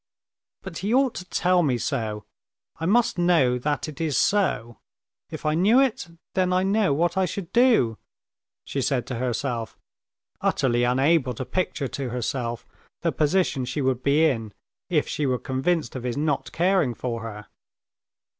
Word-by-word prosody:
"But 190 -4 -7
he 200 +4 -2
ought 265 -2 +3
to 180 - -7
tell 180 0 +2
me 135 -7 +1
so. 105 -2 -3 0.5
I 165 - -2
must 230 -2 +2
know 160 -8 +3
that 145 +4 -1
it 155 0 -8
is 155 -4 0
so. 120 - +1 0.5
If - - -8
I 155 - +2
knew 200 +10 +4
it, 260 -9 +1 0.3
then 185 -1 +1
I 185 +1 +2
know 200 -1 +2
what 170 +5 +1
I 190 - +3
should 185 0 -6
do," 235 - +4 0.7
she 140 - -3
said 130 -2 0
to 125 -3 -4
herself, 120 -1 -3 0.6
utterly 120 -2 +1
unable 130 +1 +2
to 130 - -5
picture 170 -5 -2
to 135 -3 -4
herself 120 -1 -3 0.4
the - - +1
position 155 -3 +1
she 130 +3 -3
would 130 -1 0
be 145 +4 +3
in 115 -8 -1 0.4
if 160 -5 +1
she 145 - -1
were 130 -1 +1
convinced 135 +7 -1
of 130 - -4
his 125 +1 -3
not 145 -1 -1
caring 175 -8 +2
for 115 -1 -4
her. 105 -2 -7
145 Hz, 165 wpm, -25 LUFS, 125-180 Hz, 0.7 s, knew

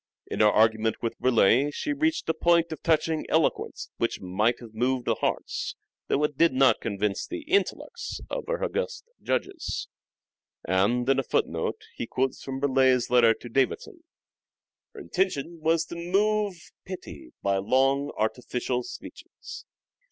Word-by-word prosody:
In - - -5
her 105 - +6
argument 110 +1 +3
with 115 - -3
Burleigh 125 +2 +4
she 290 - -2
reached 315 +2 0
a 160 - +2
point 170 +1 +3
of 160 - -6
touching 160 -1 +1
eloquence - - 0
which - - -1
might 105 +6 0
have 115 -3 -12
moved 125 +2 0
the - - +2
hearts, - - -2 0.3
though 145 - +1
it 150 -2 -1
did 165 -4 +5
not 130 0 +4
convince 100 -2 -2
the 345 -1 -5
intellects, 405 +8 -1
of - - -4
her - - -2
august 485 -1 -2 0.2
judges." 385 -4 -2 0.8
And, 100 +8 +2
in 135 0 +3
a - - 0
footnote, - - -1
he 115 - -5
quotes 130 +2 -1
from 135 0 -5
Burleigh's 130 -3 +3
letter 115 -2 +6
to - - -11
Davison, 135 - -1 0.4
" - - -67
Her 420 - -8
intention 175 - -1
was 160 +1 +2
to - - -8
move 200 +3 +1 0.3
pity 80 - -9
by 100 0 +2
long, 135 +7 +2
artificial 125 +2 -1
speeches." 155 - -10
135 Hz, 150 wpm, -27 LUFS, 115-175 Hz, 0.8 s, her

